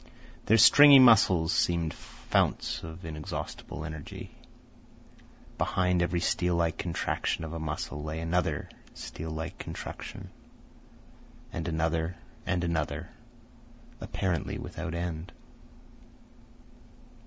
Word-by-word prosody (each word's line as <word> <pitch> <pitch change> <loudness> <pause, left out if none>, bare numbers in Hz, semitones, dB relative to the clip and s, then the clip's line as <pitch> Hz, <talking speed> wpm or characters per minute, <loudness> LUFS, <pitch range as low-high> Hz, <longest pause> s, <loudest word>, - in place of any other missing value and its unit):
Their 110 +3 +6
stringy 140 +5 +9
muscles 95 -10 +6
seemed 85 -2 +1
founts - - -1
of 80 +1 -9
inexhaustible 75 0 -6
energy. 80 -2 -8 1.3
Behind 90 -1 +1
every 85 0 0
steel 90 0 +1
like 85 -1 0
contraction 85 -1 -2
of 80 0 -6
a 85 - -4
muscle, 75 -1 -4
lay 80 +1 -4
another 80 -2 -1 0.3
steel 80 - -7
like 80 0 -5
contraction, - - -7 1.2
and - - -3
another, 80 +1 -1 0.3
and 90 -2 0
another, 85 -3 -2 0.9
apparently 90 -4 -2
without 80 - -6
end. 85 0 -4
85 Hz, 95 wpm, -29 LUFS, 80-90 Hz, 1.3 s, stringy